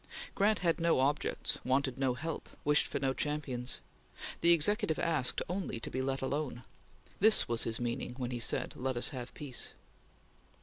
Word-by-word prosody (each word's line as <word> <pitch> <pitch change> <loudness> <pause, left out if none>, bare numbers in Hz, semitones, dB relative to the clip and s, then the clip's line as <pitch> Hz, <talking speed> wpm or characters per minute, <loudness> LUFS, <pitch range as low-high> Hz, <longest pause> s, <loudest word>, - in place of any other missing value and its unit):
Grant 210 +2 +3
had 165 0 +2
no 170 -4 +3
objects, 140 +3 0
wanted 130 0 +1
no 130 -2 +1
help, 160 +5 -5 0.2
wished 150 0 +4
for - - -3
no 135 -1 0
champions. 135 -4 -2 0.6
The 170 - +7
Executive 180 +2 +3
asked 155 -7 +1
only 180 -9 -3
to - - -6
be 130 - -1
let 135 0 -2
alone. 135 -2 -2 0.6
This 215 +2 +5
was 115 -1 0
his 115 0 -1
meaning 120 0 -3
when 125 -2 -3
he 120 - -3
said: 115 - +1
"Let 130 -1 -2
us 120 - +4
have 125 -4 -6
peace!" 135 -5 -3
135 Hz, 170 wpm, -33 LUFS, 125-160 Hz, 0.6 s, The